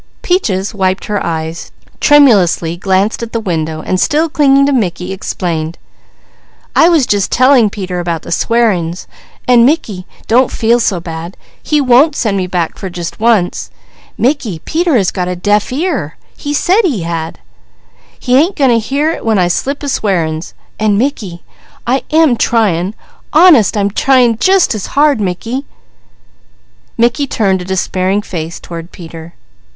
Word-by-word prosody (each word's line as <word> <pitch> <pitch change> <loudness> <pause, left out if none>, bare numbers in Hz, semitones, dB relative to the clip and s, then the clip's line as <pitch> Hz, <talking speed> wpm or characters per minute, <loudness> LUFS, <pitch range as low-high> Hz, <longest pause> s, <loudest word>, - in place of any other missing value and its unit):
Peaches 215 - -1
wiped 190 -2 -1
her 205 -1 -2
eyes, 160 0 -4 0.3
tremulously 205 - +4
glanced 190 +4 0
at 235 -1 -7
the 230 - 0
window, 160 -6 -3
and 185 - -1
still 315 +2 +1
clinging 275 -2 +3
to 285 - +1
Mickey 185 -6 -2
explained: 170 -4 -4 1.0
"I 330 - +5
was 320 -7 +3
just 205 -3 0
telling 255 -3 +4
Peter 185 -3 -5
about 170 -2 -3
the - - -9
swearin's, 185 -5 0 0.4
an' 245 -2 +5
Mickey, 230 - 0 0.2
don't 250 +3 +3
feel 230 +2 +1
so 195 -6 0
bad. 165 +1 -8 0.2
He 300 - 0
won't 275 +3 +4
send 215 -8 -1
me 185 -2 -1
back 175 -2 -3
for 190 - -5
just 175 -1 -7
once. 220 -5 +1 0.5
Mickey, 245 - -1
Peter 330 -4 +1
has 195 -5 +1
got 180 -2 -3
'a 180 - -3
deaf 205 +5 0
ear.' 275 - -2 0.2
He 290 - -6
said 360 +8 +2
he 275 - -1
had! 165 -1 -4 0.8
He 250 -1 0
ain't 325 +9 +3
goin' 270 -4 +2
to 230 - +3
hear 280 +8 -1
it - - -6
when 225 -2 +1
I 180 -2 +2
slip 275 +11 -2
a - - -3
swearin's, 170 - -2 0.2
an' 215 -2 +1
Mickey, 205 -9 -3 0.4
I 260 +3 +1
am 310 -6 +3
tryin'! 205 -5 0 0.4
Honest 305 - +5
I'm 200 0 0
tryin' 245 -1 +2
jus' 380 -5 +3
as 210 -3 -5
hard, 290 -5 +3
Mickey!" 225 +8 -3 1.3
Mickey 240 +5 +1
turned 195 -6 0
a - - -7
despairing 190 +2 -1
face 165 -3 -6
toward 170 0 -9
Peter. 165 -1 -11
210 Hz, 155 wpm, -13 LUFS, 180-265 Hz, 1.3 s, I